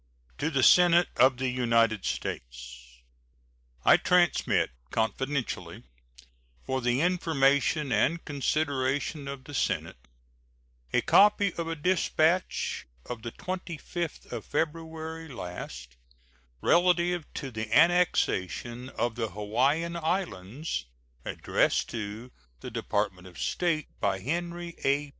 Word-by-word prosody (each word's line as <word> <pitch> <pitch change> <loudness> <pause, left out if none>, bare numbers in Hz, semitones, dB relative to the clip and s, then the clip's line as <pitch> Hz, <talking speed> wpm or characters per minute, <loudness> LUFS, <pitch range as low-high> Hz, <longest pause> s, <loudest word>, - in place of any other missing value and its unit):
To 150 - 0
the 135 -5 +1
Senate 175 +5 +6
of 130 +1 +5
the 130 +1 -1
United 115 -4 +2
States: - - -6 0.8
I - - +8
transmit 175 - +2 0.2
confidentially, 125 - -2 0.8
for 130 0 -1
the 120 +2 +1
information 150 -4 +2
and 140 +10 +1
consideration 145 0 -1
of 140 -1 -6
the 145 - -11
Senate, 65 - -2 0.8
a - - +3
copy 205 -2 +5
of 170 -1 -4
a 165 - -2
dispatch 170 - +1 0.2
of 120 -2 -6
the 115 +1 -5
25th 175 -1 -5
of - - -4
February 160 +1 -3
last 75 - -8 0.6
relative 175 -1 +2
to 135 -2 -5
the 110 -1 -5
annexation 130 - +2
of 120 -2 -1
the 115 -1 -2
Hawaiian 130 - 0
Islands, 150 - -3 0.4
addressed - - 0
to 110 +3 -6 0.3
the - - -7
Department 95 -3 -2
of 90 - -14
State 165 -4 0
by 100 -2 +1
Henry 170 - -3
A. 140 +1 +1
140 Hz, 110 wpm, -28 LUFS, 110-165 Hz, 0.8 s, I